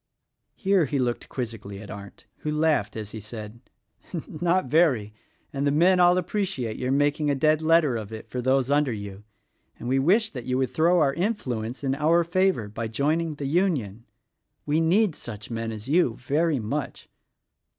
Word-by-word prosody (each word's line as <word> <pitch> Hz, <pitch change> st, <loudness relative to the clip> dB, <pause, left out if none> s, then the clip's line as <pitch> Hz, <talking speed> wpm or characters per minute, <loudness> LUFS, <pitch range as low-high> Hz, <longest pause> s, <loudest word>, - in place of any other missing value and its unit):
Here 195 Hz, -5 st, +2 dB
he 140 Hz, +1 st, -2 dB
looked 125 Hz, -2 st, -2 dB
quizzically 110 Hz, -5 st, -6 dB
at 105 Hz, -, -9 dB
Arndt, 100 Hz, 0 st, -10 dB
who 150 Hz, -, -4 dB
laughed 150 Hz, -8 st, +1 dB
as 105 Hz, -2 st, -6 dB
he 110 Hz, -, -6 dB
said, 110 Hz, +1 st, -9 dB, 0.7 s
"Not 175 Hz, +3 st, 0 dB
very; 130 Hz, -8 st, +2 dB, 0.4 s
and 140 Hz, +1 st, -1 dB
the -, -, +3 dB
men 180 Hz, +5 st, +4 dB
all 175 Hz, 0 st, +5 dB
appreciate 180 Hz, -, -2 dB
your 130 Hz, +1 st, -1 dB
making 145 Hz, +2 st, +1 dB
a 140 Hz, -, +2 dB
dead 155 Hz, +3 st, +2 dB
letter 160 Hz, -6 st, +3 dB
of 110 Hz, -1 st, -7 dB
it 110 Hz, -1 st, -8 dB
for 125 Hz, -, -4 dB
those 130 Hz, +1 st, +1 dB
under 145 Hz, -2 st, +3 dB
you, 100 Hz, -2 st, -7 dB, 0.5 s
and 120 Hz, -, -7 dB
we 135 Hz, +2 st, +2 dB
wish 205 Hz, -, +3 dB
that 125 Hz, -4 st, -7 dB
you 125 Hz, 0 st, 0 dB
would 130 Hz, -2 st, 0 dB
throw 170 Hz, +1 st, +3 dB
your 135 Hz, -1 st, +2 dB
influence 135 Hz, -, -3 dB
in 135 Hz, -1 st, +1 dB
our 160 Hz, +4 st, +3 dB
favor 180 Hz, -, +1 dB
by 110 Hz, +2 st, -4 dB
joining 155 Hz, +7 st, 0 dB
the 145 Hz, -, -5 dB
Union. 135 Hz, -, 0 dB, 0.6 s
We 150 Hz, +2 st, +1 dB
need 185 Hz, +4 st, +3 dB
such 110 Hz, -5 st, -8 dB
men 115 Hz, 0 st, -3 dB
as 110 Hz, +1 st, -8 dB
you 150 Hz, -6 st, +2 dB
very 150 Hz, +5 st, 0 dB
much." 130 Hz, +6 st, -4 dB
140 Hz, 180 wpm, -25 LUFS, 115-165 Hz, 0.7 s, all